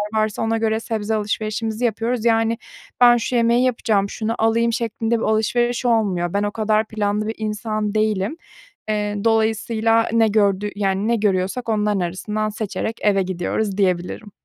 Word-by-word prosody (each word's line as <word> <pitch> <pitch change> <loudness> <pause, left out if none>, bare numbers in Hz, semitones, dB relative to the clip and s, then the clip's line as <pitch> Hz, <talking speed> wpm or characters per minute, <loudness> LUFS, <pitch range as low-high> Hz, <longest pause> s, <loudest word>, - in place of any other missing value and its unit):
varsa 215 -1 0
ona 225 0 +1
göre 220 0 0
sebze 220 -1 -2
alışverişimizi 215 +2 -2
yapıyoruz. 230 +1 -1
Yani, 225 0 +2 0.4
"Ben 240 0 +7
şu 235 +2 -2
yemeği 235 +1 +3
yapacağım, 215 -5 +1
şunu 225 +1 -3
alayım." 230 +1 +2
şeklinde 230 -1 -1
bir - - -3
alışveriş 240 +3 +1
olmuyor. 200 -7 +1
Ben 200 +1 +1
o 205 - -1
kadar 215 0 +1
planlı 210 0 -1
bir 225 - -3
insan 215 0 -3
değilim. 215 - 0 0.5
Eee, 210 -1 -1
dolayısıyla 225 0 +2
ne 225 -1 +4
gördü 205 -1 +1
yani, 195 +1 0
ne 235 - +2
görüyorsak 205 +3 -1
onların 210 -2 +1
arasından 210 +5 -2
seçerek 215 +1 -4
eve 195 -2 +3
gidiyoruz 190 +3 -2
diyebilirim. 185 +2 -1
215 Hz, 155 wpm, -21 LUFS, 205-225 Hz, 0.5 s, Ben